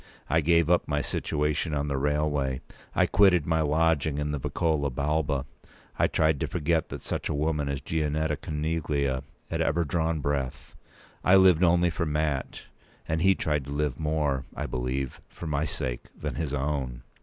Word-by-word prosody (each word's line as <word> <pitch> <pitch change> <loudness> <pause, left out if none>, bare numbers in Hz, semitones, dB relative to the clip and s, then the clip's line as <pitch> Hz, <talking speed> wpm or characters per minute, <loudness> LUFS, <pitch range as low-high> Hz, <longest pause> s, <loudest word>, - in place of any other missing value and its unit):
I 80 - +4
gave 85 +1 +3
up 90 0 +3
my 75 -1 0
situation 75 +2 -1
on 70 0 -1
the 70 - -1
railway; 75 -2 0 0.3
I - - +4
quitted 95 -6 +4
my 80 0 +1
lodging 80 -1 +2
in 75 0 -1
the 75 - -2
Vicolo 75 0 0
Balba; 70 +1 0 0.5
I - - +5
tried 80 -3 +2
to - - -1
forget 80 -1 0
p. - - -5
204that - - -8
such - - -3
a - - -1
woman 75 -1 0
as 70 -1 -2
Gianetta 75 0 0
Coneglia 75 -4 -1 0.3
had 80 0 0
ever 85 +1 +1
drawn 80 +1 0
breath. 70 -3 -3 0.5
I 90 - +6
lived 95 -3 +6
only 85 0 +4
for 85 0 -2
Mat; 75 -2 -1 0.4
and 80 +1 0
he 95 +2 +5
tried 75 -5 -1
to 70 - -7
live 70 -3 -1
more, 75 -4 0
I - - -3
believe, 65 +1 -3
for - - -9
my 75 -1 0
sake 60 -5 -3
than - - -3
his 80 -5 -3
own. 70 -3 -2
75 Hz, 180 wpm, -27 LUFS, 70-80 Hz, 0.5 s, I